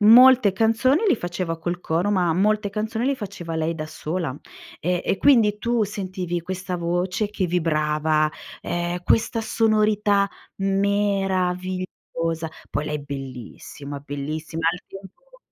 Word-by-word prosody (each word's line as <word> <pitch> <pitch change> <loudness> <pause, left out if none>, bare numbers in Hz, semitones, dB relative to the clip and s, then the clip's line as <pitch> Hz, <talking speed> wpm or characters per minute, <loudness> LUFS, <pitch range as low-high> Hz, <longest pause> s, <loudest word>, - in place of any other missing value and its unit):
molte 240 0 +8
canzoni 230 - +3
li - - +5
faceva 175 -3 -3
col 175 +2 -3
coro, 175 +4 0
ma 180 -4 +2
molte 210 +2 +2
canzoni 220 +4 -2
li 280 - +2
faceva 185 -7 -6
lei 160 +1 0
da 155 - -4
sola. 155 -2 -4 0.4
E 180 +1 0
e - - +1
quindi 225 -7 +5
tu 235 0 +1
sentivi 185 -3 -3
questa 185 0 -4
voce 180 +4 -1
che 200 -3 -1
vibrava, 155 -2 +1 0.3
ehm, 175 +1 -2
questa 225 0 +2
sonorità 210 -3 +2 0.3
meravigliosa. 185 -4 -1 0.2
Poi 150 - -1
lei 150 0 -3
bellissima, 140 +1 -7
bellissima. 155 +3 -4
Al 180 - -7
tempo 350 - -14
185 Hz, 130 wpm, -23 LUFS, 165-210 Hz, 0.4 s, molte